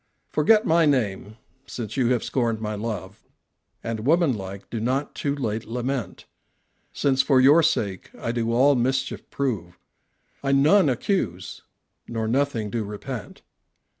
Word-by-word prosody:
Forget 215 +9 +4
my 165 -3 +4
name, 110 -6 -1 0.3
since 115 -3 -6
you 130 -3 +2
have 125 -3 +1
scorned 115 -4 -1
my 110 -1 -3
love, 105 -1 -5 0.6
And 115 -1 -3
woman 155 +4 +3
like 95 -1 -8
do 115 - -3
not 130 +5 -1
too 140 -1 -2
late 115 -5 -3
lament; 125 +2 -4 0.7
Since 135 -2 +2
for 135 -2 +3
your 145 +6 +7
sake 100 - -1
I 115 - -3
do 115 -1 -1
all 135 +5 +5
mischief 135 +1 -1
prove, 105 -11 -3 0.7
I 135 0 +1
none 150 +5 +5
accuse 115 - -2 0.5
nor 115 -1 -3
nothing 120 -4 0
do 115 -2 -1
repent. 105 +3 -7
120 Hz, 140 wpm, -24 LUFS, 110-140 Hz, 0.7 s, your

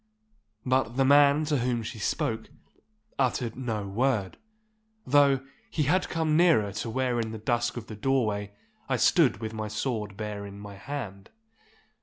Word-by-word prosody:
But 130 -2 +1
the 135 - +4
man 145 +2 +5
to 150 -2 +1
whom 120 -1 0
she 110 +1 -7
spoke 110 +2 -2 0.7
uttered 125 -3 0
no 110 -6 -3
word, 105 -2 0 0.7
though 140 -1 +4 0.2
he 155 - 0
had 180 +7 +1
come 160 -2 +1
nearer 155 - +4
to 110 +3 -4
where 125 0 0
in 115 -1 -2
the 110 - -6
dusk 120 +1 -1
of 115 - -5
the 110 - -8
doorway 105 -4 0 0.4
I - - +2
stood 155 - +4
with 110 0 -4
my 110 -1 -4
sword 105 -2 -3
bare 105 -2 -4
in 100 0 -9
my 100 0 -9
hand. 100 -3 -7
120 Hz, 160 wpm, -27 LUFS, 105-135 Hz, 0.7 s, man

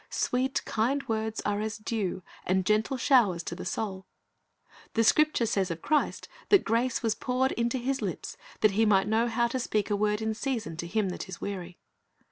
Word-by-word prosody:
Sweet, 260 +2 0
kind 255 +6 0
words 220 0 -2
are 205 0 -1
as 220 +1 -3
dew 215 -4 -3 0.2
and 185 0 +1
gentle 215 +6 +1
showers 235 - +3
to - - -5
the 180 - -7
soul. 190 -1 -4 0.9
The 225 - +4
Scripture 305 +1 +4
says 195 -4 0
of 165 -1 -5
Christ 300 -1 0 0.2
that 400 - +6
grace 235 +2 0
was 225 -2 +2
poured 255 +3 0
into 235 +2 0
His 265 +2 -1
lips, - - -4 0.3
that 215 - +5
He 215 +3 +2
might 195 -2 +4
"know 225 +2 +2
how 235 +1 +1
to 260 - -2
speak 215 -4 -1
a - - +3
word 210 +1 +1
in 220 0 -1
season 225 - -3
to 170 - -4
him 200 +1 0
that 180 - -6
is 185 - -7
weary."' 180 -3 -5
220 Hz, 195 wpm, -28 LUFS, 200-240 Hz, 0.9 s, that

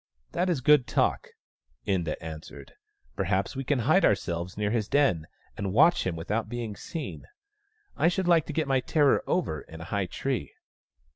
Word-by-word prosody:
" 65 - -44
That 180 +2 0
is 160 -7 0
good 145 -2 +5
talk," - - +1 0.6
Inda 85 -6 0
answered. 80 0 -9 0.2
" 405 - -38
Perhaps - - 0
we 135 - -3
can 140 +2 +1
hide 155 +11 +3
ourselves 90 -2 0
near 105 -1 0
his 110 -3 0
den, 120 - +2 0.3
and 95 -2 -3
watch 160 - +5
him 90 - -2
without 105 +7 -2
being 115 -3 -4
seen. 110 - -7 0.7
I - - +2
should 180 +1 0
like 170 -3 +4
to - - -4
get 160 -3 0
my 135 -1 +3
terror 145 +2 +2
over 115 - -1
in 80 - -12
a - - -7
high 100 -2 0
tree." - - -3
115 Hz, 185 wpm, -27 LUFS, 90-150 Hz, 0.7 s, good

